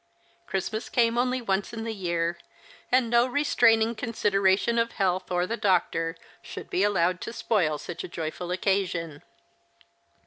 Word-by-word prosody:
Christmas 215 Hz, +4 st, -3 dB
came 235 Hz, -1 st, +2 dB
only 250 Hz, +1 st, 0 dB
once 195 Hz, 0 st, -1 dB
in 225 Hz, -1 st, -5 dB
the 225 Hz, 0 st, -3 dB
year; 170 Hz, -3 st, -2 dB, 0.5 s
and 250 Hz, -1 st, +4 dB
no 235 Hz, +1 st, +4 dB
restraining 230 Hz, -5 st, +3 dB
consideration 210 Hz, -1 st, +1 dB
of 230 Hz, 0 st, 0 dB
health 185 Hz, -2 st, 0 dB
or 180 Hz, 0 st, +1 dB
the 225 Hz, -, -2 dB
doctor 175 Hz, -5 st, +1 dB, 0.2 s
should -, -, -9 dB
be 180 Hz, -, +1 dB
allowed 185 Hz, -3 st, +2 dB
to -, -, -5 dB
spoil 185 Hz, -10 st, 0 dB
such 170 Hz, -, -7 dB
a -, -, -5 dB
joyful 170 Hz, +1 st, -5 dB
season. 180 Hz, -6 st, -1 dB
195 Hz, 145 wpm, -26 LUFS, 175-230 Hz, 0.5 s, and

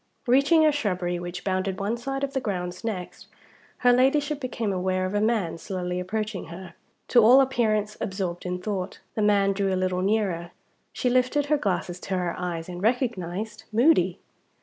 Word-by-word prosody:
Reaching 280 Hz, +6 st, +5 dB
a 305 Hz, -, +5 dB
shrubbery 180 Hz, -10 st, -1 dB
which 175 Hz, +1 st, -6 dB
bounded 190 Hz, 0 st, -1 dB
one 205 Hz, +4 st, -1 dB
side 270 Hz, +3 st, -4 dB
of 275 Hz, 0 st, -2 dB
the 270 Hz, -, +1 dB
grounds 180 Hz, -4 st, -4 dB
next, 195 Hz, -6 st, -5 dB, 0.6 s
her 245 Hz, -, +7 dB
Ladyship 285 Hz, +3 st, +2 dB
became 235 Hz, -6 st, -2 dB
aware 185 Hz, 0 st, 0 dB
of 185 Hz, -, -3 dB
a 205 Hz, -, +1 dB
man 210 Hz, -7 st, 0 dB
slowly 180 Hz, -1 st, -3 dB
approaching 210 Hz, +2 st, -3 dB
her, 170 Hz, +1 st, -9 dB, 0.4 s
to 240 Hz, -3 st, +6 dB
all 250 Hz, +5 st, +8 dB
appearance 215 Hz, -5 st, +1 dB
absorbed 185 Hz, -3 st, -3 dB
in 180 Hz, 0 st, -3 dB
thought. 190 Hz, -1 st, -4 dB
The 215 Hz, -, -2 dB
man 200 Hz, -1 st, +3 dB
drew 195 Hz, 0 st, 0 dB
a 185 Hz, -, +1 dB
little 185 Hz, 0 st, 0 dB
nearer. 190 Hz, -4 st, 0 dB, 0.4 s
She -, -, -2 dB
lifted 255 Hz, +3 st, +2 dB
her 300 Hz, +1 st, +2 dB
glasses 180 Hz, -4 st, -2 dB
to 190 Hz, +1 st, -3 dB
her 175 Hz, -2 st, -1 dB
eyes 170 Hz, -2 st, -4 dB
and 175 Hz, -1 st, -7 dB
recognized 220 Hz, -2 st, -1 dB
Moody. 215 Hz, -, +3 dB
200 Hz, 175 wpm, -26 LUFS, 180-240 Hz, 0.6 s, all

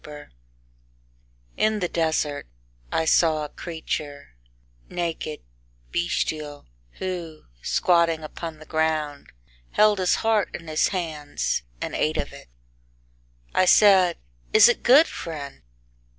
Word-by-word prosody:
III 150 Hz, -1 st, -11 dB, 1.3 s
In 215 Hz, 0 st, +2 dB
the 180 Hz, -, 0 dB
desert 160 Hz, -, -1 dB, 0.4 s
I 160 Hz, -, 0 dB
saw 155 Hz, -2 st, +3 dB
a -, -, -8 dB
creature, 155 Hz, -4 st, -6 dB, 0.6 s
naked, 165 Hz, -3 st, -4 dB, 0.5 s
bestial, 155 Hz, -4 st, -2 dB, 0.3 s
who, 175 Hz, -4 st, -6 dB, 0.2 s
squatting 170 Hz, -, +2 dB
upon 160 Hz, +1 st, -7 dB
the 155 Hz, -, -13 dB
ground, 155 Hz, -2 st, -2 dB, 0.4 s
Held 210 Hz, -1 st, +4 dB
his 185 Hz, -1 st, +2 dB
heart 220 Hz, -3 st, +1 dB
in 170 Hz, -, -9 dB
his 155 Hz, 0 st, +2 dB
hands, 160 Hz, -, -2 dB, 0.2 s
And -, -, -4 dB
ate 75 Hz, -, 0 dB
of -, -, -4 dB
it. -, -, -13 dB, 1.1 s
I 185 Hz, -, +3 dB
said, 190 Hz, -3 st, +6 dB, 0.4 s
"Is -, -, +8 dB
it 240 Hz, -, +1 dB
good, 280 Hz, +6 st, +7 dB
friend?" 145 Hz, -, -7 dB
160 Hz, 115 wpm, -24 LUFS, 155-180 Hz, 1.3 s, Is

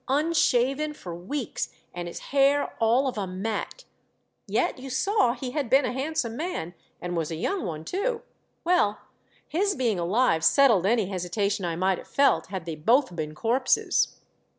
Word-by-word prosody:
— -, -, -44 dB
unshaven 300 Hz, -2 st, +1 dB
for 175 Hz, -, -8 dB
weeks, 210 Hz, +10 st, -4 dB, 0.2 s
and 175 Hz, 0 st, -5 dB
his 170 Hz, -, -7 dB, 0.2 s
hair 280 Hz, +1 st, +3 dB
all 235 Hz, +5 st, +3 dB
of 245 Hz, -5 st, -3 dB
a 195 Hz, -, -2 dB
mat; 210 Hz, -, -4 dB, 0.6 s
yet -, -, 0 dB
you 265 Hz, +1 st, -8 dB
saw 260 Hz, -, +2 dB
he 255 Hz, 0 st, -5 dB
had 280 Hz, -3 st, -2 dB
been 270 Hz, +2 st, +5 dB
a -, -, -1 dB
handsome 265 Hz, -4 st, -2 dB
man 300 Hz, -, -4 dB, 0.3 s
and 175 Hz, 0 st, -4 dB
was 165 Hz, -2 st, -1 dB
a 165 Hz, -, -3 dB
young 385 Hz, -, -2 dB
one 160 Hz, -2 st, -6 dB
too. 455 Hz, +5 st, -2 dB, 0.4 s
Well, 335 Hz, -, +2 dB, 0.5 s
his 390 Hz, +6 st, 0 dB
being 235 Hz, -8 st, 0 dB
alive 175 Hz, -2 st, +2 dB
settled 230 Hz, -10 st, +5 dB
any 225 Hz, -1 st, +2 dB
hesitation 195 Hz, +2 st, -2 dB
I 170 Hz, -1 st, -2 dB
might 185 Hz, +2 st, +1 dB
have -, -, -12 dB
felt 280 Hz, 0 st, +2 dB
had 185 Hz, -3 st, -5 dB
they 165 Hz, -, -4 dB
both 225 Hz, -, +2 dB
been 155 Hz, -2 st, -4 dB
corpses. 250 Hz, -, +1 dB
235 Hz, 175 wpm, -26 LUFS, 180-280 Hz, 0.6 s, been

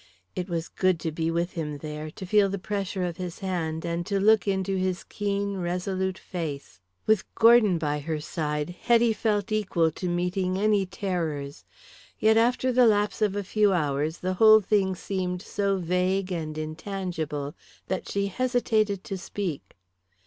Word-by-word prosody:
It 180 Hz, +1 st, -3 dB
was 170 Hz, -1 st, -2 dB
good 185 Hz, -3 st, +1 dB
to 160 Hz, -, -2 dB
be 160 Hz, +1 st, -1 dB
with 170 Hz, +2 st, -1 dB
him 150 Hz, -3 st, -4 dB
there, 150 Hz, +1 st, -6 dB
to 185 Hz, -, -8 dB
feel 200 Hz, +1 st, +4 dB
the 200 Hz, -, -2 dB
pressure 195 Hz, -1 st, -3 dB
of 175 Hz, -2 st, -3 dB
his 180 Hz, -2 st, -5 dB
hand, 165 Hz, -4 st, -3 dB
and 170 Hz, 0 st, -2 dB
to 200 Hz, -2 st, 0 dB
look 215 Hz, +1 st, +4 dB
into 195 Hz, 0 st, 0 dB
his 185 Hz, -1 st, -1 dB
keen, 200 Hz, -1 st, -2 dB
resolute 185 Hz, +1 st, -2 dB
face. 150 Hz, -, -6 dB, 0.3 s
With 215 Hz, -3 st, +3 dB
Gordon 225 Hz, -5 st, +6 dB
by 150 Hz, -2 st, -1 dB
her 155 Hz, +1 st, -3 dB
side 150 Hz, 0 st, -3 dB
Hetty 230 Hz, +5 st, +3 dB
felt 215 Hz, -1 st, -1 dB
equal 190 Hz, -6 st, +1 dB
to 180 Hz, +3 st, -4 dB
meeting 180 Hz, +1 st, 0 dB
any 205 Hz, -1 st, +2 dB
terrors. 165 Hz, -7 st, -3 dB, 0.5 s
Yet 220 Hz, 0 st, +4 dB
after 245 Hz, +3 st, +3 dB
the 250 Hz, -1 st, +5 dB
lapse 210 Hz, -1 st, +1 dB
of 205 Hz, -2 st, +2 dB
a 205 Hz, -, -1 dB
few 205 Hz, +1 st, +2 dB
hours 150 Hz, -1 st, 0 dB
the 185 Hz, +1 st, -2 dB
whole 215 Hz, +3 st, +7 dB
thing 195 Hz, -2 st, +1 dB
seemed 180 Hz, -1 st, -3 dB
so 200 Hz, -1 st, 0 dB
vague 185 Hz, +2 st, 0 dB
and 155 Hz, -3 st, -3 dB
intangible 155 Hz, -3 st, -4 dB, 0.3 s
that 185 Hz, -, -3 dB
she 200 Hz, 0 st, 0 dB
hesitated 215 Hz, -2 st, 0 dB
to 195 Hz, -2 st, -5 dB
speak. 180 Hz, -, -5 dB
185 Hz, 165 wpm, -26 LUFS, 165-205 Hz, 0.5 s, whole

